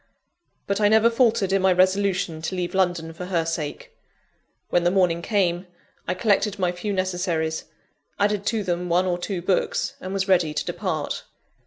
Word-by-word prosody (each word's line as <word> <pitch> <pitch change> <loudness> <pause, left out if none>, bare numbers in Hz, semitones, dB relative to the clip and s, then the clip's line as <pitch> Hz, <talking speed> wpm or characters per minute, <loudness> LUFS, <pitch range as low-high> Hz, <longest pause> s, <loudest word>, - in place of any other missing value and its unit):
But 200 +1 -1
I 205 - +5
never 220 +2 +5
faltered 230 -5 +2
in 195 - +3
my 190 0 +4
resolution 185 -3 +1
to 175 +4 -3
leave 180 -1 -3
London 175 -4 0
for 180 +2 -7
her 175 -3 0
sake. 165 -3 -5 0.8
When 175 - +3
the 175 - +4
morning 180 -3 +2
came, 180 -2 0 0.4
I 180 - 0
collected 205 0 +1
my 180 -2 +1
few 180 +4 -4
necessaries, 175 -4 -1 0.5
added 205 0 +1
to 220 -3 0
them 175 -1 -2
one 180 +2 +3
or 175 -1 -1
two 180 -1 -4
books, 185 +1 0
and 185 - -6
was 195 0 -1
ready 175 -5 +2
to - - -1
depart. 175 -4 -3
185 Hz, 175 wpm, -24 LUFS, 175-195 Hz, 0.8 s, I